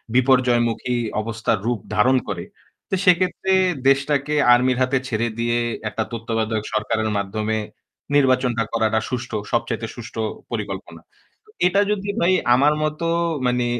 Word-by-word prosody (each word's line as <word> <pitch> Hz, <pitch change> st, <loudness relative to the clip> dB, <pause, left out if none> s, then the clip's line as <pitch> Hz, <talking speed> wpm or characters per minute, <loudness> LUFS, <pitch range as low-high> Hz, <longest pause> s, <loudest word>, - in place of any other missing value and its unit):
বিপর্যয়মুখী 125 Hz, -2 st, +2 dB, 0.3 s
অবস্থার 115 Hz, 0 st, -1 dB
রূপ 120 Hz, -2 st, 0 dB, 0.2 s
ধারণ 130 Hz, +5 st, +4 dB
করে। 90 Hz, -4 st, -4 dB, 0.5 s
তো 190 Hz, -, +1 dB
সেক্ষেত্রে 185 Hz, +1 st, +2 dB, 0.4 s
দেশটাকে 140 Hz, +1 st, +2 dB, 0.2 s
আর্মির 125 Hz, +1 st, +3 dB
হাতে 130 Hz, +1 st, +1 dB
ছেড়ে 115 Hz, -1 st, -1 dB
দিয়ে 120 Hz, 0 st, +1 dB, 0.3 s
একটা 110 Hz, -, -2 dB
তত্ত্বাবধায়ক 115 Hz, -2 st, -2 dB
সরকারের 110 Hz, +1 st, 0 dB
মাধ্যমে 105 Hz, +2 st, -2 dB, 0.6 s
নির্বাচনটা 130 Hz, -4 st, +3 dB
করাটা 110 Hz, -1 st, +2 dB
সুষ্ঠ 125 Hz, -2 st, -4 dB, 0.2 s
সবচাইতে 115 Hz, -1 st, -1 dB
সুষ্ঠ 120 Hz, -1 st, -10 dB, 0.4 s
পরিকল্পনা। -, -, -5 dB, 0.7 s
এটা 195 Hz, +3 st, +3 dB
যদি 200 Hz, -1 st, -2 dB
ভাই 175 Hz, +2 st, +4 dB, 0.2 s
আমার 145 Hz, +4 st, +4 dB
মত 155 Hz, 0 st, -2 dB, 0.5 s
মানে 125 Hz, 0 st, +1 dB
120 Hz, 120 wpm, -22 LUFS, 115-135 Hz, 0.7 s, ধারণ